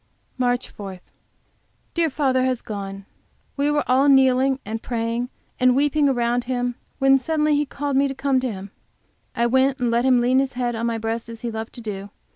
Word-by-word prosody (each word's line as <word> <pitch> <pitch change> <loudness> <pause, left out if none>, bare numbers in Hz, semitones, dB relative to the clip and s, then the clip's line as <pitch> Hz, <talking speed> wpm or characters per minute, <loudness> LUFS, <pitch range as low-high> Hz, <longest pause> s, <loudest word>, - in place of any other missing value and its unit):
MARCH 245 -1 0
4. 195 -2 -8 1.0
Dear 335 -2 +2
father 260 -3 +1
has 255 -2 -1
gone. 195 -2 -6 0.5
We 285 +1 +1
were 295 0 +1
all 265 +3 +4
kneeling 265 0 +4
and 220 +2 -4
praying 235 +1 -2 0.3
and 255 -1 +4
weeping 290 +1 +3
around 240 -1 0
him, 245 -1 -1 0.2
when 270 0 +5
suddenly 305 +2 +1
he 290 0 +1
called 285 0 -3
me 275 +1 +4
to 270 - -5
come 270 -1 +1
to 255 -2 -2
him. 195 -1 -8 0.6
I 235 - +2
went 260 +2 +3
and 245 -3 0
let 235 +1 +2
him 255 -2 +5
lean 250 +2 +3
his 270 0 -1
head 245 -1 -1
on 230 +1 -2
my 230 -1 -1
breast, 225 +1 -3
as 230 -1 -9
he 240 -2 -3
loved 220 0 -6
to 240 - -9
do. 200 -2 -5
250 Hz, 200 wpm, -23 LUFS, 230-270 Hz, 1.0 s, when